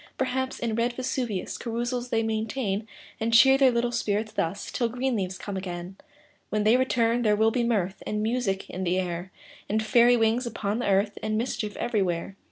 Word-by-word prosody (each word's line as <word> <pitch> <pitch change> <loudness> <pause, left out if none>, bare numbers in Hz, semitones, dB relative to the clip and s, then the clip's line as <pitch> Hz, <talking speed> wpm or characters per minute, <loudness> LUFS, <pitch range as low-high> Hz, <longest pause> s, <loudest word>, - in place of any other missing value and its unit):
Perhaps, 260 0 -1
in 230 -2 -2
red 235 +2 0
Vesuvius 245 -6 -3
Carousals 240 +1 -3
they 225 -2 +1
maintain; 220 -1 -2 0.3
And 225 +1 0
cheer 265 +4 +7
their 270 -1 +5
little 240 0 0
spirits 215 -2 -1
thus, 180 +5 -3
Till 235 -2 0
green 250 +2 -1
leaves 185 -3 -2
come 200 +1 -6
again. 180 -1 -5 0.5
When 215 0 0
they 215 +3 +5
return, 245 -2 +2
there 210 -3 +3
will 220 +1 +3
be 240 +1 0
mirth 200 -5 0
And 210 0 -1
music 220 -4 -1
in 185 - -5
the 180 0 +1
air, 180 0 -4 0.4
And 220 +2 +1
fairy 240 +2 +5
wings 230 +2 +2
upon 215 -1 -2
the 245 - -1
earth, 200 +2 +1
And 215 0 -1
mischief 220 -3 -2
everywhere. 195 -6 -1
225 Hz, 185 wpm, -26 LUFS, 200-240 Hz, 0.5 s, cheer